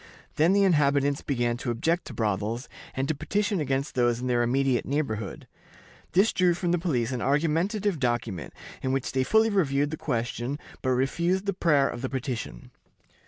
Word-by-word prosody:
Then 165 +5 +4
the 200 0 +4
inhabitants 145 -5 +3
began 120 -3 -1
to 120 - -4
object 165 +9 0
to - - -8
brothels, 110 +3 -1 0.3
and 135 +1 -1
to 155 - +1
petition 205 +6 -1
against 135 0 -1
those 120 -2 +2
in 125 - -4
their 120 -1 +2
immediate 130 +1 +1
neighborhood. 110 -9 -3 0.7
This 195 +5 +4
drew 180 -2 +3
from 175 0 -1
the 175 - +2
police 130 -9 0
an 125 -2 -3
argumentative 165 - +1
document, 115 - -2 0.3
in 130 - -1
which 135 -1 -1
they 130 0 +1
fully 220 - +3
reviewed 145 -7 +1
the 155 - -4
question, 120 +1 -2 0.2
but 130 - -1
refused 170 +9 +1
the 200 - 0
prayer 150 -6 +3
of 120 - -5
the 130 - -2
petition. 125 - -5
140 Hz, 175 wpm, -27 LUFS, 120-170 Hz, 0.7 s, Then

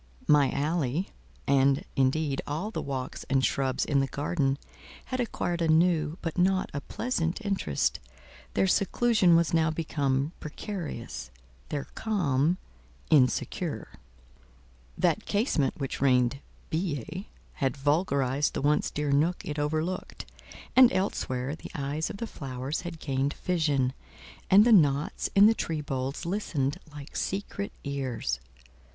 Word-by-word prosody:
My 145 -2 +5
alley, 150 +3 -1 0.4
and, 135 0 +3
indeed, 135 +1 +1
all 160 +9 -3
the - - -3
walks 130 -2 -4
and 135 -1 +3
shrubs 130 -2 0
in 140 -2 +2
the 135 - +1
garden, 140 -1 0 0.5
had 255 - -3
acquired 175 -7 -1
a 165 - +2
new, 160 -1 +3
but 165 +1 -2
not 185 +1 +2
a 140 - -3
pleasant 170 - -2
interest; 190 - 0 0.6
their - - +3
seclusion 200 -1 +3
was 170 -1 +2
now 160 -1 +3
become 145 -3 0
precarious; 150 - -6 0.4
their 140 - -2
calm—insecure. 135 - 0 1.1
That 180 +4 +1
casement 200 - +1
which 135 -2 -4
rained 125 -1 +3 0.3
billets, 165 - -3 0.3
had 135 0 +1
vulgarized 140 -2 +1
the - - -1
once 150 +1 +2
dear 150 -1 -2
nook 155 +6 +1
it 150 0 -3
overlooked; 155 +5 -2 0.5
and 255 -1 +8
elsewhere, 140 -8 -1
the - - -10
eyes 145 +1 -2
of - - -6
the 230 - -3
flowers 135 - -4
had 175 -2 -7
gained 135 0 -1
vision, 145 -7 +1 0.6
and 200 +3 +8
the 240 - +6
knots 145 -5 +3
in 200 +1 +8
the 220 - +7
tree 160 -7 -2
boles 135 +2 -3
listened 165 -7 -1
like 145 0 -10
secret 200 +1 -3
ears. 130 - -2
150 Hz, 130 wpm, -28 LUFS, 135-175 Hz, 1.1 s, and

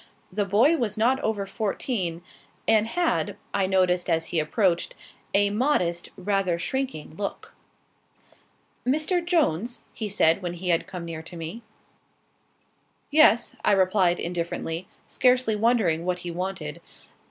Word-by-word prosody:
The 205 +1 0
boy 235 - +4
was 225 -5 -2
not 250 +5 +3
over 215 -6 -1
fourteen, 195 -4 -2 0.4
and 220 0 +4
had, 345 +7 0 0.2
I 195 -1 +1
noticed 185 -2 +2
as 165 -1 +1
he 165 - +3
approached, 170 +2 0 0.4
a 200 0 +4
modest, 205 -8 0
rather 190 -2 0
shrinking 175 - -4
look. 200 -1 -5 1.3
"Mr. 310 +7 +1
Jones?" 245 - 0
he 215 -2 -4
said, 190 -2 +3
when 175 -1 -4
he 180 +1 -4
had 170 -1 +2
come 180 -2 -6
near 165 -1 -6
to 165 +2 -10
me. 165 +8 -6 1.5
"Yes," 290 -6 +5
I 210 - +4
replied, 185 -2 +3
indifferently, 170 0 -3 0.2
scarcely 250 -3 +2
wondering 210 -7 +2
what 180 0 -1
he 175 - -3
wanted. 175 -4 -4
195 Hz, 130 wpm, -25 LUFS, 170-230 Hz, 1.5 s, Yes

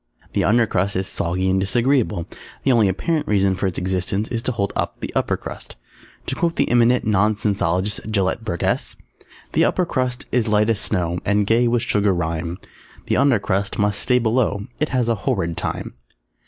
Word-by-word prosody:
The - - +1
Under 115 +3 +4
Crust 100 -1 -1
is 95 +1 0
soggy 95 +1 -1
and 95 0 +2
disagreeable. 115 -2 +1 0.4
The 135 - +3
only 115 -4 +4
apparent 150 - -1
reason 100 -2 +2
for 95 +1 -1
its 90 - -4
existence 95 +3 -1
is 115 -1 -2
to 130 - -1
hold 100 -4 -2
up - - -2
the - - -6
Upper - - 0
Crust. - - -8 0.5
To - - -3
quote 170 -1 0
the - - +1
eminent 120 +1 +4
Nonsensologist 105 -2 0
Gelett 100 0 0
Burgess 85 -6 -1 0.6
The - - +3
Upper 180 - +2
Crust 125 -5 -2
is 120 -3 +1
light 105 +1 +3
as 105 - 0
snow 90 -5 -1
And 100 +1 +2
gay 115 +3 +3
with 120 -1 +1
sugar 100 -2 +2
rime; 85 0 -2 0.5
The - - +1
Under 140 -4 +4
Crust 100 0 -1
must 105 -1 +1
stay 125 - +2
below, 110 -3 +1
_It 150 - 0
has 125 -3 0
a 115 - +3 0.2
horrid 85 0 0
time. - - -4
105 Hz, 185 wpm, -21 LUFS, 95-120 Hz, 0.6 s, Under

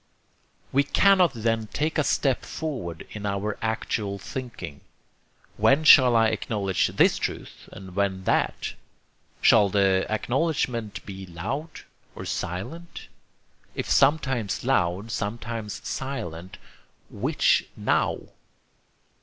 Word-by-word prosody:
We 140 - +4
cannot 185 +2 +4
then 115 -1 -1
take 155 +9 -1
a - - +3
step 135 -2 +1
forward 120 - -5
in 105 - -7
our 100 +1 -2
actual 110 -2 -2
thinking. 100 - -7 0.8
When 140 +3 +4
shall 130 -6 +8
I 115 -1 +5
acknowledge 105 -4 0
this - - +3
truth - - -6
and 95 -1 -11
when 95 -1 0
that? - - 0 0.7
Shall 100 -1 +6
the 95 -1 +2
acknowledgment 120 -1 -1
be 95 -1 -8
loud? 120 - -5 0.3
or - - -7
silent? 165 - -5 0.7
If - - -3
sometimes 135 -7 +2
loud, 100 -4 0
sometimes 110 -1 -4
silent, 95 -9 -5 0.5
which - - +2
NOW? - - 0
110 Hz, 105 wpm, -25 LUFS, 100-135 Hz, 0.8 s, shall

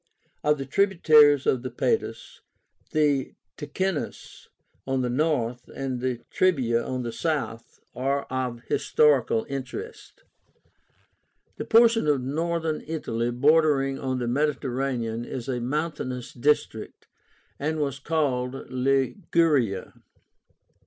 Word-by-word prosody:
Of 150 0 +3
the 135 - -5
tributaries 150 -4 +5
of 130 - +2
the 130 - -4
Padus, 440 - -2 0.5
the 145 -4 +1 0.2
Ticínus 170 +3 -4 0.4
on 135 -1 0
the 125 - -1
north, 125 -4 -1
and 130 -2 -3
the 125 -2 -2
Trebia 130 -11 +2
on 130 -1 -3
the 120 - -4
south, 115 -6 -3
are 140 +2 -1
of 125 -2 -4
historical 125 -3 +2
interest. 425 - -7 1.3
The - - -4
portion 230 -4 +5
of 145 -2 +3
Northern 160 +3 -1
Italy 120 -7 -2
bordering 140 +1 +3
on 130 -1 -2
the 120 -1 -2
Mediterranean 130 -4 -1
is 120 0 -6
a 125 -2 -2
mountainous 130 -2 -3
district, 145 +5 -1 0.5
and 155 +2 -1
was 140 -2 -2
called 135 -4 -2
LIGURIA. 135 - +1
135 Hz, 110 wpm, -25 LUFS, 125-155 Hz, 1.3 s, tributaries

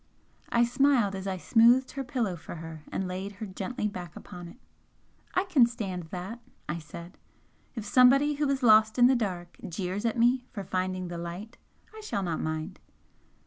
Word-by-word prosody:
I 235 - +3
smiled 245 -4 +3
as 190 0 -5
I 190 -1 -2
smoothed 240 +6 +4
her 275 - -4
pillow 235 -7 -1
for 170 - -9
her 160 -1 -8
and 190 - -2
laid 190 +2 -5
her 200 +2 -6
gently 210 +3 -3
back 180 -5 -7
upon 175 -1 -9
it. 170 - -13 0.8
"I 370 - +3
can 290 -11 +5
stand 190 -7 -5
that!" 185 +7 -6 0.3
I 170 +2 -3
said 170 +3 -11 0.6
"If 225 -3 -5
somebody 265 +6 +5
who 290 0 0
is 275 -1 0
lost 220 -1 +6
in 245 - +7
the 260 +1 +5
dark 180 -7 -3
jeers 185 +3 -3
at 230 +1 0
me 245 +2 +3
for 200 - -6
finding 185 -1 -2
the 170 -1 -5
light, 180 +7 -7 0.4
I 435 - -9
shall 200 - -2
not 170 -3 -2
mind!" 155 0 -4
200 Hz, 185 wpm, -28 LUFS, 180-245 Hz, 0.8 s, in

